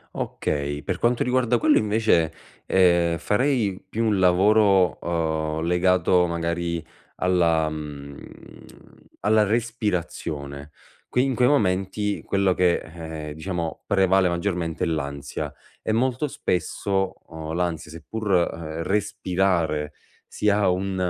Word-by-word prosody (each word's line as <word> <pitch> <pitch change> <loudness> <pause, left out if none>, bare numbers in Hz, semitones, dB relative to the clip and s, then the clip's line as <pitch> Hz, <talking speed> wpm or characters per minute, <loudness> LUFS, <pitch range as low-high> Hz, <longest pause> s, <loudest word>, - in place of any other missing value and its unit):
Okay, 75 0 -2
per 90 +2 -3
quanto 120 +3 +1
riguarda 125 -1 +2
quello 155 +3 +4
invece, 105 -7 +2 0.3
ehm, 85 -3 +3
farei 110 -4 +1
più 115 +4 -1
un 105 -3 +2
lavoro, 95 +1 +4
uhm, 80 -2 -1
legato 90 +1 +3
magari 85 -1 -2 0.3
alla, 85 -3 +2
mhmm, 70 -2 -7 1.0
alla 105 +1 +3
respirazione. 90 - -3 0.4
Qui 125 - +1
in 130 -3 -1
quei 125 +1 +4
momenti, 100 -4 0
quello 100 -2 +1
che, 90 -1 +3
ehm, 80 -2 -7
diciamo 85 0 -4
prevale 95 -1 +3
maggiormente 85 -2 -2
è - - +1
l'ansia, 70 -3 -4 0.3
e - - -1
molto 130 +5 +1
spesso, 95 -4 -1
uhm, 80 -1 -7
l'ansia 85 -3 -2
seppur, 105 +7 -6 0.2
mhmm, 80 0 -6
respirare 90 -6 0 0.3
sia 105 -2 +1
un 95 +1 -1
90 Hz, 115 wpm, -24 LUFS, 80-105 Hz, 1.0 s, quello